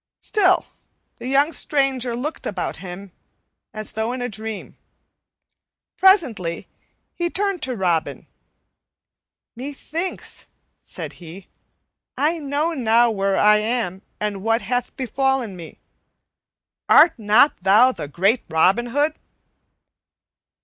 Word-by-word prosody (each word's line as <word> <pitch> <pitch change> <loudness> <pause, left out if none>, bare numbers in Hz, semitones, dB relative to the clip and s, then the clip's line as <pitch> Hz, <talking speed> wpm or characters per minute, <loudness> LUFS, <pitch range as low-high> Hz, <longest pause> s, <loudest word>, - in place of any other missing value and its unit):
Still 375 -4 +2 0.5
the - - -7
young 280 +4 +3
stranger 270 -6 0
looked 290 +7 -5
about 190 -4 -3
him, 185 +2 -9 0.6
as 215 -1 -4
though 220 +2 -2
in 255 - -5
a - - -1
dream. 220 -1 -7 1.2
Presently 255 - +2 0.5
he 345 0 -2
turned 390 -1 0
to 255 -3 -2
Robin. 175 -6 -1 1.3
"Methinks," 290 +7 -5 0.3
said - - -7
he, 175 +3 -11 0.7
"I 320 +4 +1
know 295 +3 -1
now 235 -3 +3
where 195 -2 0
I 210 0 +5
am 215 -4 -2 0.2
and 210 -2 -3
what 225 +3 +1
hath 245 0 -3
befallen 265 -4 -1
me. 170 -3 -11 1.1
Art 335 - +7
not 215 +7 +4
thou 220 +7 +5
the 150 - -7
great 195 - +1
Robin 190 +9 +2
Hood?" 290 +5 +1
240 Hz, 110 wpm, -21 LUFS, 200-285 Hz, 1.3 s, Art